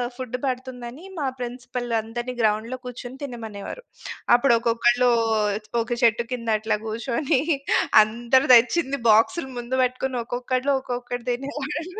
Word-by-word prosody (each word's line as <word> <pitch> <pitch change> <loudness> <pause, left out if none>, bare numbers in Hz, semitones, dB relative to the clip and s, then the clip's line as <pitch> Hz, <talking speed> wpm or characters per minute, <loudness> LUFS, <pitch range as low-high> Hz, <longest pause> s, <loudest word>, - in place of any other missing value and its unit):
Food 250 -1 -4
పడుతుందని, 255 +2 -5 0.2
మా 280 - 0
principal 245 0 -5
అందరిని 240 +3 -5
గ్రౌండ్‌లో 220 +4 0
కూర్చొని 250 +1 -8
తినమనేవారు. 230 - -7 0.5
అప్పుడు 240 0 +4
ఒక్కొక్కళ్ళు, 240 +1 +3 0.7
ఒక 230 - -6
చెట్టు 235 0 +3
కింద 230 -2 -4
అట్లా 220 0 0
కూర్చొని 240 +4 0 0.6
అందరు 240 +5 +1
తెచ్చింది 270 +4 +4
బాక్స్‌లు 230 +7 +3
ముందు 240 +2 -3
పెట్టుకొని 255 0 -1
ఒక్కొక్కళ్ళు 255 +3 -1
ఒక్కొక్కటి 245 -1 -5
తినేవాళ్ళు. 290 +4 -4
245 Hz, 115 wpm, -24 LUFS, 235-260 Hz, 0.7 s, అప్పుడు